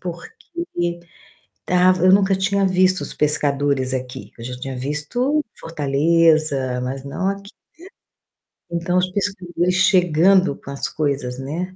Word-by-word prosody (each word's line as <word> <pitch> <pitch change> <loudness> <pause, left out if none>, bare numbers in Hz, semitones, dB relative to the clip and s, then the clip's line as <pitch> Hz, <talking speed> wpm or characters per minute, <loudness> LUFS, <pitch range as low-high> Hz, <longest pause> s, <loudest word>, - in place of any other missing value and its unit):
porque 180 - -5 0.6
estava 180 0 +2
eu 185 - +7
nunca 195 0 +4
tinha 200 +1 +1
visto 185 0 +2
os - - -5
pescadores 145 -3 0
aqui, 130 -1 -6
eu 115 - -10
já 125 +1 -6
tinha 135 +1 -5
visto 155 - -1 0.2
Fortaleza, 155 -3 +1
mas 130 +2 -4
não 185 +7 -2
aqui, 200 +1 -6 1.2
né, 170 - -2
então 175 +2 0
os 185 0 +1
pescadores 180 -3 -1
chegando 185 -2 +4
com - - -13
as 140 - -2
coisas, 140 -4 -2
né. 170 +8 -5
170 Hz, 135 wpm, -20 LUFS, 140-185 Hz, 1.2 s, eu